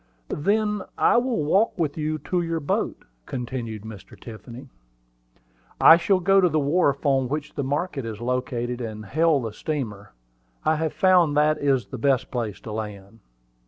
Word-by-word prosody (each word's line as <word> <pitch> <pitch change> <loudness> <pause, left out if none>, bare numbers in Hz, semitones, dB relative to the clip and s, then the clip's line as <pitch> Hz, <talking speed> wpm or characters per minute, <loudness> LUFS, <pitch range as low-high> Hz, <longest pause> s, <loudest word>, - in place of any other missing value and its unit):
"Then 210 +5 0 0.2
I - - +4
will 240 - 0
walk 195 +10 +2
with 155 -5 -1
you 155 0 -2
to 175 +4 -2
your 165 -1 -2
boat," 145 - -2 0.2
continued 120 -4 -5
Mr. 110 -3 -11
Tiffany. 120 +3 -10 1.1
"I 165 - +9
shall 185 +3 +2
go 195 +2 +4
to 180 - +4
the 155 0 +1
wharf 145 -1 +1
on 135 -3 +2
which 150 +1 -4
the 140 - -3
market 145 +1 -2
is 110 -2 -6
located, 125 0 -2
and 110 -2 -6
hail 155 +6 +2
the 115 -4 -5
steamer. 105 - -5 0.5
I 155 0 +3
have 160 0 -2
found 180 -6 +4
that 150 +1 +3
is 135 -3 +1
the 130 - -8
best 135 -1 +1
place 115 -5 -3
to 110 - -8
land." 105 0 -7
140 Hz, 165 wpm, -24 LUFS, 120-165 Hz, 1.1 s, I